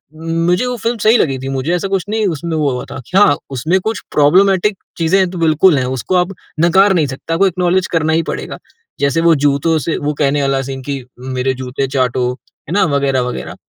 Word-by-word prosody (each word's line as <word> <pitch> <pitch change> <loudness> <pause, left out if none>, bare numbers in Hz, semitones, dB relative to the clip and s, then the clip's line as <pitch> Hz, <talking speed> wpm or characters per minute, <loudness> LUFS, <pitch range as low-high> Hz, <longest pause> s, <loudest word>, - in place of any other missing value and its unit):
मुझे 165 +5 0
वो 250 0 -2
फ़िल्म 230 +2 -2
सही 225 +3 +5
लगी 135 -4 0
थी, 135 +1 -5
मुझे 135 +5 -2
ऐसा 180 +3 -2
कुछ 195 -2 -1
नहीं 220 0 0
उसमें 165 -1 -3
वो 145 -3 +1
हुआ 125 - -4
था, - - -6
कि 185 - 0
हाँ, 170 -8 +5 0.2
उसमें 155 +9 0
कुछ 220 -1 -2
प्रोब्लेमेटिक 190 +6 +3 0.2
चीज़ें 180 +3 +2
तो 180 - -7
बिल्कुल 160 +1 +4
हैं, 130 - 0
उसको 130 +8 -2
आप 180 +2 +1 0.3
नकार 190 +4 +4
नहीं 155 -5 +1
सकता, 135 +5 -5
आपको 195 +4 +3
एक्नॉलेज 180 +1 0
करना 160 -1 +1
ही 165 +1 +2
पड़ेगा। - - -6 0.4
जैसे 140 +3 +1
वो 165 -1 +4
जूतों 145 +3 +2
से 165 - 0
वो 150 +1 -2
कहने 145 0 +2
वाला 135 -1 0
सीन 135 0 -6
कि, 140 -2 -4 0.2
"मेरे 130 0 -2
जूते 130 +1 -3
चाटो", 125 -1 0 0.4
है - - -3
ना, 205 - +3
वग़ैरह 135 -2 +1
वग़ैरह। 125 0 -5
160 Hz, 215 wpm, -16 LUFS, 135-185 Hz, 0.4 s, सही